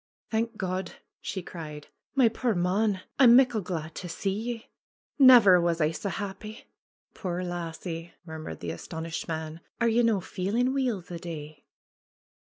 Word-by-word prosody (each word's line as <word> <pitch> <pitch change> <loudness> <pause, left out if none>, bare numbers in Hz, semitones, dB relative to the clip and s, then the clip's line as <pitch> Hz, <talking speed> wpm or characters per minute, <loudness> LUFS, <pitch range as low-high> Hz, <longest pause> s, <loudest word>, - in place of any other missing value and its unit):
^^Thank 225 0 -1
God 185 -1 -3
!" - - -59
she 190 - -4
cried. 150 -4 -8 0.3
^^My 235 -4 +5
puir 235 -2 0
mon! 190 +3 +1 0.2
I'm 240 -3 +8
muckle 250 -4 +5
glad 165 -4 -4
to 180 - -7
see 195 +3 -2
ye. 230 +2 -5 0.5
Never 235 -9 +8
was 170 -1 +1
I 155 -1 +2
sae 200 +5 -4
happy 205 +4 -6 0.3
!" - - -55
'Tuire 180 -2 -3
lassie!" 170 -1 -5
murmured 160 - -7
the 85 - -3
astonished 160 - -5
man. 160 0 -4 0.2
'^Are 235 -1 +3
ye 240 - +4
no' 225 -4 +3
feelin' 215 +9 -1
weel 250 -8 0
the 175 -1 -8
day 155 -3 -8
185 Hz, 160 wpm, -28 LUFS, 165-225 Hz, 0.5 s, I'm